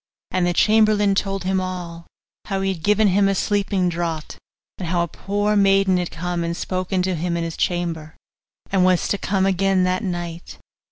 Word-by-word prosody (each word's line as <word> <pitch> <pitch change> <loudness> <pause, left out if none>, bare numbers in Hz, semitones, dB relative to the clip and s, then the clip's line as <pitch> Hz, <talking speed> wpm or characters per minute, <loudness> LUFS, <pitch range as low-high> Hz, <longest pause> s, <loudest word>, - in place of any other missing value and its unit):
And 180 -1 +1
the 175 - +1
chamberlain 215 0 +4
told 195 -1 -1
him 190 0 0
all 175 -2 -6 0.4
how 195 -1 -2
he 195 0 0
had 170 - -10
given 210 +3 +3
him 195 +2 +3
a 195 - +1
sleeping 200 -2 0
draught, 170 -2 -3 0.4
and 180 - -4
how 170 0 +1
a - - -2
poor 205 +4 -1
maiden 195 -2 +4
had 180 -1 -2
come 175 +1 -3
and 170 0 -3
spoken 185 0 -2
to 185 0 0
him 170 +1 -2
in 170 - -2
his 165 -1 -4
chamber, 165 -3 -2 0.5
and 190 -2 +3
was 185 -1 +3
to 200 - 0
come 195 -1 0
again 195 0 +2
that 185 +3 0
night. 175 -2 -5
185 Hz, 190 wpm, -21 LUFS, 175-195 Hz, 0.5 s, chamberlain